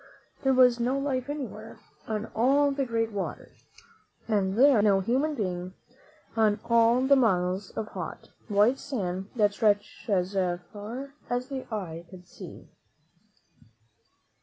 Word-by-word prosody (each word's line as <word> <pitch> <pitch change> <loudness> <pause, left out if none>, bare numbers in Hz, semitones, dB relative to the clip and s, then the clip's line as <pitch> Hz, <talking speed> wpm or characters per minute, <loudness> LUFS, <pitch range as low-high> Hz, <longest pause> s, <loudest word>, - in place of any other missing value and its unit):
There 265 -1 +2
was 250 -2 +5
no 250 +3 +1
life 275 -2 -2
anywhere 235 -7 -6 0.3
on 215 -1 -2
all 280 +5 +3
the 275 -1 -1
great 225 -1 -1
water, 200 -2 -5 0.8
and 200 -3 0
there 275 0 +6
was 205 - +3
no 200 -2 +4
human 270 +9 0
being 185 -4 -3 0.6
on 215 -2 +3
all 235 +1 +4
the 270 +2 +5
miles 185 -5 +1
of 215 -1 -3
hot, - - -7 0.2
white 215 +5 +3
sand 195 -7 -4
that 205 -3 +3
stretched 205 +1 0
away 200 - +3
as 180 +2 -2 0.4
far 240 +7 -7 0.2
as 245 +2 -2
the 265 -3 -6
eye 170 -5 -5
could 180 -1 -13
see. - - -11
225 Hz, 140 wpm, -27 LUFS, 200-260 Hz, 0.8 s, there